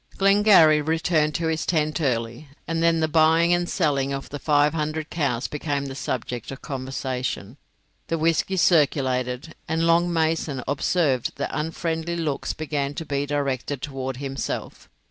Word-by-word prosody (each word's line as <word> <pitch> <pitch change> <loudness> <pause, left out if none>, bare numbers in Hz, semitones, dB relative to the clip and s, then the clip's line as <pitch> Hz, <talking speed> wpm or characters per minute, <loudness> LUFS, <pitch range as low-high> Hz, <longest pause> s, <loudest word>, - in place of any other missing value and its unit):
Glengarry 195 -6 +6
returned 160 -1 +1
to 165 - -1
his 160 0 0
tent 155 -1 0
early, 120 0 -2 0.2
and 165 0 -1
then 165 -1 +3
the 160 - +2
buying 160 +2 +4
and 175 0 0
selling 140 -6 +1
of 135 0 -5
the 145 - -5
five 150 0 +3
hundred 155 0 -3
cows 140 -6 -1
became 145 -1 -2
the 135 - -5
subject 125 -3 -4
of 135 - -8
conversation; 130 -4 -4 0.5
the 165 - -1
whisky 165 +4 +1
circulated, 135 -5 +1
and 165 +1 0
Long 170 +1 +3
Mason 160 -5 0
observed 140 -1 +1
that - - -3
unfriendly 165 +2 -2
looks 155 -5 -2
began 145 -2 -3
to 165 - -5
be 140 -1 -2
directed 140 -1 -2
towards 130 -2 -4
himself. 135 0 -5
150 Hz, 150 wpm, -24 LUFS, 135-165 Hz, 0.5 s, Glengarry